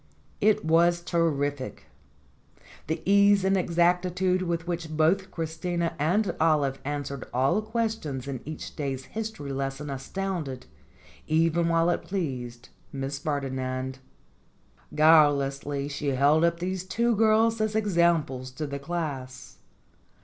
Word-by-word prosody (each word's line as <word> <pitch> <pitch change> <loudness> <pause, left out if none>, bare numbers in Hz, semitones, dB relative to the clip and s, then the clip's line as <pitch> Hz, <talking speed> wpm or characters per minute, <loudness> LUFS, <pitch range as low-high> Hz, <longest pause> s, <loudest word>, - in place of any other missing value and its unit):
It 210 -5 +3
was 170 +2 +4
terrific. 145 -6 -1 1.0
The 160 +1 -3
ease 200 0 +5
and 195 0 +3
exactitude 180 +1 +1
with 170 -2 -2
which 170 -2 -3
both 160 +5 +1
Christina 165 +1 -2
and 185 +8 +1
Olive 150 -4 +2
answered 140 -2 -4
all 135 +11 +2
questions 215 - -3
in 135 -3 -4
each 155 +1 -7
day's 135 -3 -3
history 215 -9 -5
lesson 135 +1 -3
astounded, 150 -1 -4 0.6
even 165 +1 +2
while 165 +1 +3
it - - -1
pleased, 125 -10 -4 0.2
Miss 140 0 -4
Ferdinand. 130 -3 -3 1.0
Guilelessly 145 -2 +3
she 145 0 -4
held 140 +4 +3
up 170 0 +2
these 185 +1 -3
two 230 +5 +1
girls 220 +1 +3
as 215 0 0
examples 170 -10 +1
to 150 +3 -4
the 140 -1 -5
class. 140 -5 -5
160 Hz, 120 wpm, -27 LUFS, 140-180 Hz, 1.0 s, ease